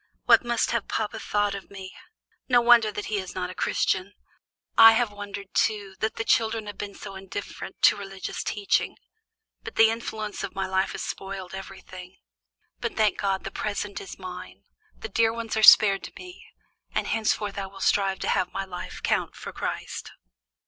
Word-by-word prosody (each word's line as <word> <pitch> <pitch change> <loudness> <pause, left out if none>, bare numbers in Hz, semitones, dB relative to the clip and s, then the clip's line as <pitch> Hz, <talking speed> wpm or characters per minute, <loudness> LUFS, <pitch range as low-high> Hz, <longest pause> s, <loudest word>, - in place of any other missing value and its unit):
What - - +6
must 240 -1 0
have 235 -3 -1
papa 220 0 -2
thought 205 -1 0
of 200 -1 -8
me? 190 -1 -9 0.6
No 245 -1 +6
wonder 235 -2 +6
that 210 - -5
he 210 -2 -1
is 185 -1 -7
not 180 -1 -3
a - - -8
Christian. 190 +1 0 0.6
I 225 0 +10
have 230 -1 +1
wondered, 200 -1 -8
too, 205 -3 0
that 220 - -1
the 225 - -2
children 225 -1 +1
have 205 -1 -8
been 200 -1 -5
so 195 - -9
indifferent 195 +1 -8
to - - +7
religious 195 -2 -6
teaching, 205 -1 0 0.6
but - - -8
the 225 0 +6
influence 220 -2 -5
of 200 -1 -5
my 195 0 -1
life 190 0 0
has - - -4
spoiled 195 -1 -6
everything. 190 -1 -9 0.6
But, - - -4
thank 215 -2 +2
God! 195 -1 0
the - - -5
present 205 -1 -3
is 195 - -9
mine, 185 -1 -9 0.4
my - - -5
dear 225 -1 +2
ones 230 -1 -4
are 220 - +1
spared 200 -2 +8
to - - -10
me, 365 0 -12 0.5
and - - +1
henceforth 210 -2 -1
I 195 - -4
will 195 0 -13
strive 195 -1 +2
to - - -1
have 180 - +1
my 195 - -3
life 180 -2 -8
count - - 0
for - - -8
Christ." - - -5
200 Hz, 185 wpm, -26 LUFS, 195-220 Hz, 0.6 s, I